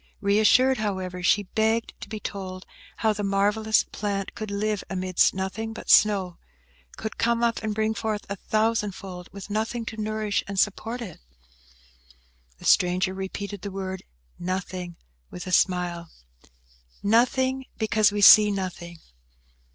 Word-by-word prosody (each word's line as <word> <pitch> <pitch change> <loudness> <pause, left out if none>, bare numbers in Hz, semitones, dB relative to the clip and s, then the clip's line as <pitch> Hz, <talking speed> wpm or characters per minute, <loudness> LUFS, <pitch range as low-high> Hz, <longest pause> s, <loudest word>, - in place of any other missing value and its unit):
Reassured, 220 +5 +4
however, 190 -4 -3
she 205 +3 +3
begged 220 +3 0
to - - -8
be 215 0 -5
told 185 -2 -6 0.3
how 220 -1 +2
the 210 - -5
marvellous 205 +2 +2
plant 200 -2 -4
could 215 -1 -6
live 205 0 -1
amidst 185 -1 +2
nothing 200 +4 -4
but - - -3
snow; 195 -4 +4 0.6
could 220 - -6
come 235 0 +1
up, 230 -1 +1
and 215 -1 -3
bring 220 0 0
forth 215 0 -3
a 200 - -4
thousand 215 -1 0
fold, 180 -2 -9
with 200 +1 -9
nothing 225 +2 -2
to 220 -1 -5
nourish 215 -1 -1
and 200 -1 -3
support 225 +4 -1
it? 185 -8 -10 1.4
The - - -13
stranger 185 +1 +3
repeated 195 +1 -6
the 200 - -5
word 190 -1 -5 0.4
"nothing" 180 -1 -4 0.3
with 180 - -8
a 185 - -5
smile. 175 -2 +1 0.9
"Nothing, 260 +4 +2
because 220 -1 +3
we 205 0 -2
see 210 +1 +9
nothing!" 180 -3 -5
205 Hz, 145 wpm, -25 LUFS, 185-220 Hz, 1.4 s, see